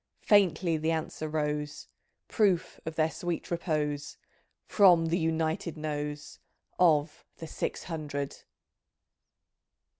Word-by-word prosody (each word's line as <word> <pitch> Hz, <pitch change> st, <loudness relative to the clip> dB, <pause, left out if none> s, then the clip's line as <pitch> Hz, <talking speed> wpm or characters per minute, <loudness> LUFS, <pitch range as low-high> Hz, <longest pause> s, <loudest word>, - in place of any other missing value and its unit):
Faintly 180 Hz, -5 st, +3 dB
the 160 Hz, +1 st, -1 dB
answer 160 Hz, -1 st, -2 dB
rose, 150 Hz, -1 st, -2 dB, 0.4 s
<Proof 195 Hz, -6 st, +1 dB
of 160 Hz, -, -4 dB
their 160 Hz, 0 st, +2 dB
sweet 170 Hz, +3 st, -4 dB
repose). 150 Hz, -4 st, -2 dB, 0.5 s
From 180 Hz, -5 st, +5 dB
the 170 Hz, +3 st, +1 dB
United 160 Hz, 0 st, -1 dB
Nose 150 Hz, -1 st, -5 dB, 0.4 s
Of 155 Hz, -4 st, +3 dB
the 165 Hz, -, -7 dB
Six 155 Hz, -, -4 dB
Hundred! 145 Hz, -4 st, -4 dB
160 Hz, 100 wpm, -29 LUFS, 150-170 Hz, 0.5 s, From